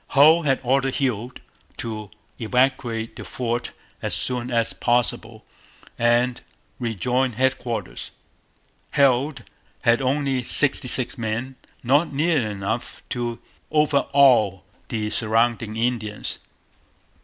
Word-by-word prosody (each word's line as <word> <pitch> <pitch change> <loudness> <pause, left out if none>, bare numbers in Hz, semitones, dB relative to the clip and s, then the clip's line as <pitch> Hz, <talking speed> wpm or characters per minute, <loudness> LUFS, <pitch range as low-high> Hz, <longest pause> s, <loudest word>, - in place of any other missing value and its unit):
Hull 155 +4 +7
had 135 -4 +1
ordered 135 +1 +1
Heald 125 -2 -2 0.4
to 110 -3 -5 0.3
evacuate 120 -1 0
the - - -7
fort 120 -1 -3 0.3
as - - -1
soon 125 -1 -2
as 115 -2 +1
possible 120 -2 0 0.5
and 120 +1 +2 0.4
rejoin 125 +2 0
headquarters. 125 - -2 0.9
Heald 140 +1 +3 0.4
had 120 +1 +4
only 135 0 +1
sixty 130 +1 +1
six 125 +1 0
men, 115 +4 -3 0.3
not 145 +7 +3
nearly 150 -2 +2
enough 105 +3 -4
to 120 -1 -2 0.3
overawe 140 -9 +4 0.3
the 105 -2 -2
surrounding 115 -1 +1
Indians. 115 -3 -2
125 Hz, 100 wpm, -23 LUFS, 115-135 Hz, 0.9 s, Hull